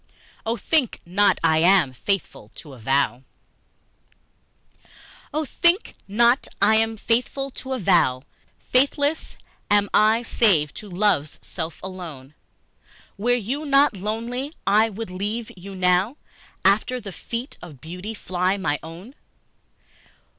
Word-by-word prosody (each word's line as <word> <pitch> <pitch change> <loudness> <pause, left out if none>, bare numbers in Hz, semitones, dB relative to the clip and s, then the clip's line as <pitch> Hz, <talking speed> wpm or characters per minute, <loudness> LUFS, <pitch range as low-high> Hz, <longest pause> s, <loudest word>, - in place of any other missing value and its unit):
III. - - -30
Oh, 230 +1 0
think 295 -5 0
not 195 +2 +3
I 160 -1 +4
am 170 -5 +4
faithful 160 - -3
to 145 -4 -10
a 130 - -13
vow! 135 +2 +1 2.1
OH, 310 +1 -1
THINK 345 - +1
not 235 +6 +3
I 215 +2 +5
am 225 0 +1
faithful 250 +5 -1
to 265 +1 -6
a - - -1
vow! 170 - +2 0.5
Faithless 285 +4 +1 0.3
am 205 -1 +3
I 220 +2 +4
save 175 -11 +2
to 210 - -9
love's 180 -6 +1
self 165 -2 -6
alone. 165 -8 -8 0.8
Were 215 +4 -2
you 245 +6 -3
not 280 -4 +4
lovely 230 +7 -4
I 215 +3 +4
would 220 -2 -7
leave 210 +5 -4
you 195 +2 -10
now: 185 +7 +2 0.5
After 215 +6 +3
the 205 -4 -8
feet 235 - -6
of 155 -7 -11
beauty 180 - -7
fly 185 0 -1
my 150 -7 -1
own. 170 +10 -11
205 Hz, 130 wpm, -23 LUFS, 175-235 Hz, 2.1 s, I